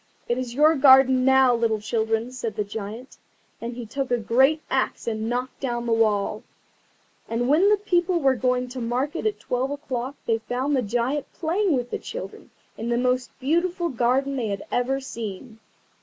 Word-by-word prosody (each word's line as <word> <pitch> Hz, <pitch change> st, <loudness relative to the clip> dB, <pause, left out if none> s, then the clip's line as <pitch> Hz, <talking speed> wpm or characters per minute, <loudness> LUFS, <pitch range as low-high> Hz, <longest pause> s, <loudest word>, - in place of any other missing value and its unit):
"It 240 Hz, +1 st, 0 dB
is 245 Hz, -2 st, -5 dB
your 305 Hz, +3 st, +5 dB
garden 265 Hz, -2 st, +6 dB
now, 265 Hz, -1 st, +5 dB
little 230 Hz, -2 st, +1 dB
children," 225 Hz, +2 st, -1 dB
said 235 Hz, -4 st, -5 dB
the 210 Hz, -, -1 dB
Giant, 215 Hz, +4 st, -7 dB, 0.4 s
and 235 Hz, +1 st, -5 dB
he 240 Hz, -1 st, -6 dB
took 270 Hz, +4 st, -3 dB
a 245 Hz, -, +2 dB
great 265 Hz, +7 st, +3 dB
axe -, -, -1 dB
and 220 Hz, 0 st, -2 dB
knocked 250 Hz, +2 st, -3 dB
down 240 Hz, -3 st, -2 dB
the 230 Hz, -, +1 dB
wall. 215 Hz, -1 st, +1 dB, 0.9 s
And 235 Hz, +2 st, -1 dB
when 325 Hz, +9 st, +4 dB
the 420 Hz, -, +4 dB
people 360 Hz, -3 st, +1 dB
were 270 Hz, -4 st, +3 dB
going 250 Hz, 0 st, 0 dB
to 250 Hz, 0 st, -6 dB
market 260 Hz, -, -1 dB
at 425 Hz, -, -2 dB
twelve 250 Hz, +2 st, -2 dB
o'clock 275 Hz, -2 st, -4 dB
they 225 Hz, -1 st, +1 dB
found 255 Hz, +6 st, -1 dB
the 260 Hz, -, +2 dB
Giant 245 Hz, +6 st, -2 dB
playing 350 Hz, -1 st, 0 dB
with 245 Hz, -1 st, -4 dB
the -, -, -2 dB
children -, -, -8 dB, 0.3 s
in 230 Hz, +2 st, -3 dB
the 235 Hz, -, +1 dB
most 250 Hz, +1 st, 0 dB
beautiful 345 Hz, +5 st, 0 dB
garden 265 Hz, +2 st, +1 dB
they 235 Hz, -4 st, -1 dB
had 200 Hz, -1 st, -4 dB
ever 260 Hz, +2 st, 0 dB
seen. 225 Hz, -3 st, -7 dB
250 Hz, 185 wpm, -24 LUFS, 230-275 Hz, 0.9 s, garden